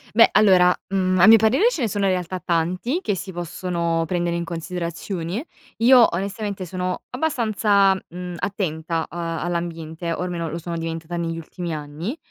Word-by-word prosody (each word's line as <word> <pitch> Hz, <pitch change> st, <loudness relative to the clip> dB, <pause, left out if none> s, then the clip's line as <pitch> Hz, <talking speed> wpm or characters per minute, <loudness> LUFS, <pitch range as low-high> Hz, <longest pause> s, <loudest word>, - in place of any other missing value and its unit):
Beh, 230 Hz, -, +7 dB
allora, 185 Hz, -4 st, +6 dB, 0.2 s
mhmm, 185 Hz, -1 st, +2 dB
a 190 Hz, -, +7 dB
mio 225 Hz, -, +10 dB
parere 225 Hz, -, +4 dB
ce 335 Hz, -, -4 dB
ne 230 Hz, -, +1 dB
sono 200 Hz, 0 st, -1 dB
in 190 Hz, -, +3 dB
realtà 185 Hz, 0 st, -2 dB
tanti 180 Hz, -, -1 dB
che 205 Hz, -, -1 dB
si 190 Hz, +1 st, -6 dB
possono 170 Hz, -1 st, -2 dB
prendere 175 Hz, 0 st, -1 dB
in 170 Hz, -, -3 dB
considerazione. 170 Hz, -, -4 dB, 0.3 s
Io, 245 Hz, +1 st, +7 dB
onestamente, 200 Hz, +1 st, -3 dB
sono 180 Hz, +1 st, -3 dB
abbastanza, 215 Hz, -8 st, +2 dB
mhmm, 180 Hz, -1 st, -7 dB
attenta 165 Hz, -4 st, -2 dB
a 170 Hz, 0 st, -5 dB, 0.2 s
all'ambiente 170 Hz, -1 st, -3 dB
o 165 Hz, -, -4 dB
almeno 175 Hz, -2 st, -3 dB
lo 160 Hz, -, -4 dB
sono 170 Hz, 0 st, -5 dB
diventata 165 Hz, +1 st, -4 dB
negli 165 Hz, -1 st, -2 dB
ultimi 170 Hz, +1 st, -6 dB
anni. 155 Hz, -, -5 dB
180 Hz, 165 wpm, -22 LUFS, 170-200 Hz, 0.3 s, mio